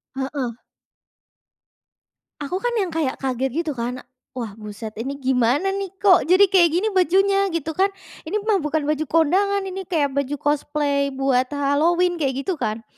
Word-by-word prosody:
Heeh. 265 Hz, -3 st, -3 dB, 1.9 s
Aku 320 Hz, +6 st, -2 dB
kan 485 Hz, +2 st, -1 dB
yang 390 Hz, -6 st, 0 dB
kayak 315 Hz, -5 st, -1 dB
kaget 265 Hz, 0 st, -2 dB
gitu 320 Hz, -, -3 dB
kan, 250 Hz, -1 st, -4 dB, 0.3 s
wah 235 Hz, -4 st, -4 dB
buset 215 Hz, +1 st, -7 dB
ini 270 Hz, +4 st, -3 dB
gimana 265 Hz, +6 st, +1 dB
nih 390 Hz, 0 st, -3 dB
kok 385 Hz, -4 st, +4 dB
jadi 370 Hz, +3 st, +6 dB
kayak 350 Hz, -3 st, +5 dB
gini 390 Hz, +5 st, +1 dB
bajunya? 390 Hz, +2 st, +3 dB
Gitu 330 Hz, -4 st, -3 dB
kan. 380 Hz, +5 st, +2 dB, 0.4 s
Ini 330 Hz, -, -3 dB
mah 425 Hz, -3 st, +2 dB
bukan 305 Hz, 0 st, -1 dB
baju 305 Hz, +1 st, 0 dB
kondangan, 380 Hz, +6 st, +2 dB
ini 380 Hz, -1 st, -6 dB
kayak 295 Hz, -5 st, 0 dB
baju 280 Hz, +1 st, -1 dB
cosplay 290 Hz, -1 st, 0 dB
buat 265 Hz, -1 st, +1 dB
Halloween 335 Hz, +5 st, +2 dB
kayak 275 Hz, -2 st, -1 dB
gitu 360 Hz, -2 st, -3 dB
kan. 220 Hz, -1 st, -2 dB
300 Hz, 155 wpm, -22 LUFS, 265-370 Hz, 1.9 s, jadi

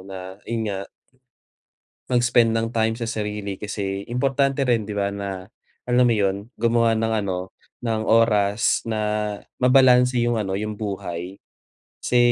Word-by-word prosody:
na 95 Hz, +1 st, -9 dB
yon 115 Hz, -1 st, -1 dB
nga. 95 Hz, 0 st, -5 dB, 1.2 s
Mag-spend 120 Hz, -1 st, +3 dB
ng 115 Hz, 0 st, 0 dB
time 110 Hz, 0 st, +1 dB
sa 115 Hz, -, -3 dB
sarili 105 Hz, -3 st, -3 dB
kasi 100 Hz, -1 st, -4 dB
importante 135 Hz, +2 st, +1 dB
rin 115 Hz, -3 st, +2 dB
di 105 Hz, -, -8 dB
ba 100 Hz, 0 st, -1 dB
na 95 Hz, -2 st, -5 dB, 0.4 s
alam 125 Hz, +1 st, +3 dB
mo -, -, +3 dB
yon, 100 Hz, +1 st, -1 dB
gumawa 115 Hz, -1 st, +3 dB
ng 115 Hz, 0 st, 0 dB
ano, 95 Hz, -1 st, -4 dB, 0.3 s
ng 110 Hz, -2 st, -1 dB
oras 110 Hz, -1 st, +3 dB
na 110 Hz, -1 st, -2 dB, 0.6 s
mabalanse 125 Hz, -1 st, +5 dB
yung 120 Hz, 0 st, +1 dB
ano 95 Hz, -2 st, -2 dB
yung 105 Hz, 0 st, -3 dB
buhay 95 Hz, -3 st, -5 dB, 0.6 s
kasi 125 Hz, -, +1 dB
110 Hz, 140 wpm, -23 LUFS, 100-120 Hz, 1.2 s, mabalanse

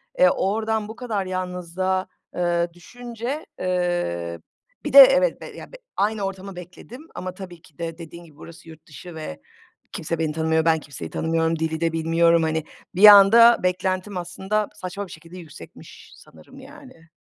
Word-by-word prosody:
E, -, -, +5 dB
oradan 220 Hz, +1 st, -1 dB
bu 220 Hz, -, -9 dB
kadar 220 Hz, -6 st, -3 dB
yalnızlığa, 185 Hz, 0 st, -3 dB, 0.3 s
eee, 175 Hz, -1 st, 0 dB
düşünce, 240 Hz, -, -7 dB
eee, 175 Hz, -, -2 dB, 0.5 s
bir -, -, -4 dB
de -, -, +10 dB
evet, -, -, +6 dB
b -, -, -8 dB
ya, -, -, -11 dB
b -, -, -12 dB, 0.2 s
aynı 210 Hz, +1 st, -1 dB
ortamı 195 Hz, 0 st, -6 dB
bekledim 215 Hz, -, -12 dB
ama 185 Hz, 0 st, -6 dB
tabii 180 Hz, -3 st, -11 dB
ki 150 Hz, -, -22 dB
de 165 Hz, -1 st, -6 dB
dediğin 170 Hz, +1 st, -11 dB
gibi 155 Hz, -3 st, -19 dB
burası 165 Hz, 0 st, -13 dB
yurt 160 Hz, 0 st, -15 dB
dışı 160 Hz, +3 st, -11 dB
ve 80 Hz, -, -8 dB, 0.5 s
kimse 165 Hz, +1 st, -4 dB
beni 155 Hz, -2 st, -1 dB
tanımıyor, 160 Hz, 0 st, 0 dB
ben 165 Hz, -1 st, +3 dB
kimseyi 140 Hz, -, -9 dB
tanımıyorum, 165 Hz, 0 st, -1 dB
dili 160 Hz, 0 st, -3 dB
de 165 Hz, -1 st, 0 dB
bilmiyorum, 165 Hz, +1 st, +2 dB
hani, 160 Hz, -1 st, -1 dB, 0.3 s
bir 190 Hz, -, +2 dB
anda 220 Hz, +3 st, +8 dB
beklentim 185 Hz, +2 st, -2 dB
aslında 190 Hz, +4 st, -3 dB
saçma 190 Hz, +2 st, -6 dB
bir 175 Hz, -, -14 dB
şekilde 165 Hz, +3 st, -12 dB
yüksekmiş 165 Hz, -3 st, -14 dB
sanırım 270 Hz, -, -17 dB
yani. 265 Hz, -, -15 dB
180 Hz, 165 wpm, -22 LUFS, 165-205 Hz, 0.5 s, de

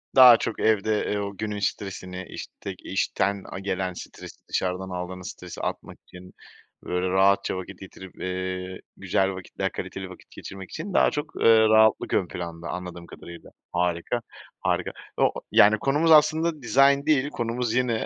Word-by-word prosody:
Daha 125 Hz, -3 st, +10 dB
çok 110 Hz, -, -4 dB
evde, 110 Hz, 0 st, +2 dB
eee, 105 Hz, -, 0 dB
o 100 Hz, -1 st, -5 dB
günün 105 Hz, -2 st, -3 dB
stresini 95 Hz, -2 st, -4 dB
iştek -, -, -8 dB
işten 100 Hz, 0 st, -1 dB
a 95 Hz, -, -5 dB
gelen 95 Hz, -1 st, -2 dB
stresi -, -, -10 dB
dışarıdan 95 Hz, +1 st, -2 dB
aldığınız 90 Hz, 0 st, -6 dB
stresi 90 Hz, -1 st, -10 dB
atmak -, -, -5 dB
için 90 Hz, 0 st, -13 dB, 0.5 s
böyle 90 Hz, +1 st, -1 dB
rahatça 95 Hz, 0 st, +3 dB
vakit 95 Hz, -, -8 dB
getirip, 95 Hz, -1 st, -12 dB
eee, 95 Hz, 0 st, -4 dB, 0.2 s
güzel 95 Hz, 0 st, +1 dB
vakitler, 95 Hz, -, -4 dB
kaliteli -, -, -6 dB
vakit -, -, -14 dB
geçirmek 95 Hz, -1 st, -9 dB
için 180 Hz, +4 st, -6 dB
daha -, -, +4 dB
çok, 150 Hz, 0 st, -2 dB, 0.2 s
eee, 115 Hz, -1 st, +7 dB
rahatlık 110 Hz, 0 st, +4 dB
ön 90 Hz, -, +2 dB
planda 85 Hz, -1 st, -6 dB
anladığım 90 Hz, -1 st, -6 dB
kadarıyla. 85 Hz, 0 st, -11 dB, 0.2 s
Harika, 90 Hz, +6 st, -1 dB, 0.4 s
harika. -, -, -1 dB, 0.3 s
O -, -, +3 dB
o -, -, +4 dB, 0.2 s
yani 105 Hz, +1 st, +6 dB
konumuz 150 Hz, +6 st, +2 dB
aslında 155 Hz, 0 st, +4 dB
dizayn 140 Hz, +3 st, +4 dB
değil 145 Hz, -2 st, +2 dB
konumuz 120 Hz, -2 st, -2 dB
yine 120 Hz, -3 st, 0 dB
100 Hz, 155 wpm, -25 LUFS, 90-120 Hz, 0.5 s, Daha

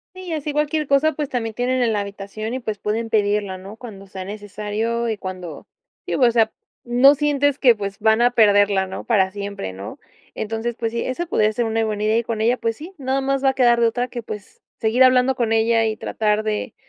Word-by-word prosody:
Sí, 370 Hz, -, -9 dB
y 350 Hz, -, -5 dB
así 300 Hz, -1 st, -3 dB
cualquier 300 Hz, 0 st, 0 dB
cosa, 285 Hz, +3 st, +3 dB
pues 295 Hz, -1 st, -3 dB
también 225 Hz, -4 st, -3 dB
tienen 250 Hz, +2 st, 0 dB
en 235 Hz, -2 st, +2 dB
la 210 Hz, -, 0 dB
habitación 200 Hz, +2 st, -6 dB
y 255 Hz, -, -2 dB
pues 215 Hz, -4 st, -4 dB
pueden 225 Hz, +3 st, -2 dB
pedirla, 205 Hz, -3 st, 0 dB
¿no?, 195 Hz, +3 st, -10 dB
cuando 205 Hz, -5 st, -11 dB
sea 190 Hz, 0 st, -7 dB
necesario 210 Hz, +3 st, -3 dB
y 220 Hz, -, -1 dB
cuando 185 Hz, -5 st, -8 dB, 0.4 s
sí, -, -, -2 dB
o 250 Hz, -3 st, +4 dB
sea, 225 Hz, -2 st, +3 dB, 0.3 s
no 245 Hz, +4 st, +5 dB
sientes 285 Hz, -1 st, +1 dB
que 245 Hz, -4 st, +6 dB
pues 200 Hz, -1 st, -5 dB
van 220 Hz, +1 st, +3 dB
a 245 Hz, +1 st, +4 dB
perderla, 205 Hz, -4 st, +4 dB
¿no?, 190 Hz, -, -7 dB
para 195 Hz, -5 st, +2 dB
siempre, 200 Hz, -, -5 dB
¿no?, 95 Hz, +2 st, -9 dB, 0.3 s
entonces 225 Hz, +2 st, -3 dB
pues 230 Hz, -1 st, -2 dB
sí, 235 Hz, +1 st, -2 dB
eso 335 Hz, +7 st, -3 dB
podría 215 Hz, -6 st, +2 dB
ser 235 Hz, +2 st, -1 dB
una 225 Hz, 0 st, 0 dB
buena 210 Hz, -1 st, -3 dB
idea, 215 Hz, +1 st, +2 dB
y 235 Hz, -, -1 dB
con 225 Hz, -1 st, -3 dB
ella, 235 Hz, +3 st, +3 dB
pues 225 Hz, -2 st, -2 dB
sí, 325 Hz, +8 st, -10 dB
nada 265 Hz, 0 st, -1 dB
más 275 Hz, 0 st, -1 dB
va 270 Hz, -, +5 dB
a -, -, -4 dB
quedar 240 Hz, -2 st, +4 dB
de 235 Hz, -, +4 dB
otra 245 Hz, +2 st, -1 dB
que 245 Hz, -, -5 dB
pues 210 Hz, -3 st, -9 dB, 0.2 s
seguir 230 Hz, +4 st, +4 dB
hablando 255 Hz, 0 st, +4 dB
con 230 Hz, -2 st, 0 dB
ella 225 Hz, 0 st, +3 dB
y 220 Hz, -, -1 dB
tratar 215 Hz, -1 st, 0 dB
de, 215 Hz, +2 st, -3 dB
225 Hz, 230 wpm, -21 LUFS, 210-255 Hz, 0.4 s, que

